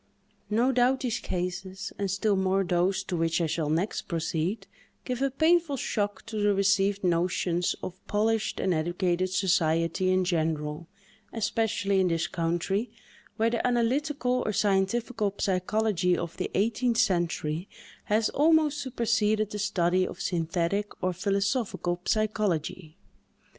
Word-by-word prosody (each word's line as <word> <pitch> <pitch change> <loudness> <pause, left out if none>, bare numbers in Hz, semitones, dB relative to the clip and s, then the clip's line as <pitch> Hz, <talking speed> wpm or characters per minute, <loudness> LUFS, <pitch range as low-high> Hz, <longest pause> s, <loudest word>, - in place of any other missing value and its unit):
No 235 +5 +2
doubt 255 +1 +2
these 245 -4 -1
cases, 185 +1 -4
and 200 -1 -1
still 200 +2 +1
more 190 0 +1
those 180 +1 +1
to 180 - -4
which 165 0 +1
I 170 - +1
shall 155 -1 -1
next 170 +7 -1
proceed, 165 +3 -2 0.4
give 250 0 -3
a 275 - +2
painful 315 +1 +2
shock 205 -4 -2
to 230 -2 -6
the 205 -1 +3
received 195 0 +2
notions 175 0 +1
of 185 +1 -7
polished 220 +1 0
and 185 - +1
educated 175 +3 0
society 175 -1 +1
in 185 0 +2
general—especially 190 +6 -2
in 185 - +3
this 165 -1 0
country, 175 +6 -1 0.5
where 225 +1 +2
the 235 +1 0
analytical 250 +1 +1
or - - -1
scientifical 205 +2 0
psychology 185 -1 +1
of 170 -1 -5
the - - -2
eighteenth 230 +3 +1
century 170 -3 0 0.4
has 215 +1 +2
almost 305 -1 +3
superseded 215 -4 0
the 210 - -4
study 185 -3 +1
of - - -9
synthetic 175 +4 -1
or 185 0 +1
philosophical 195 -1 -1
psychology. 190 -7 -1
195 Hz, 130 wpm, -27 LUFS, 175-220 Hz, 0.5 s, the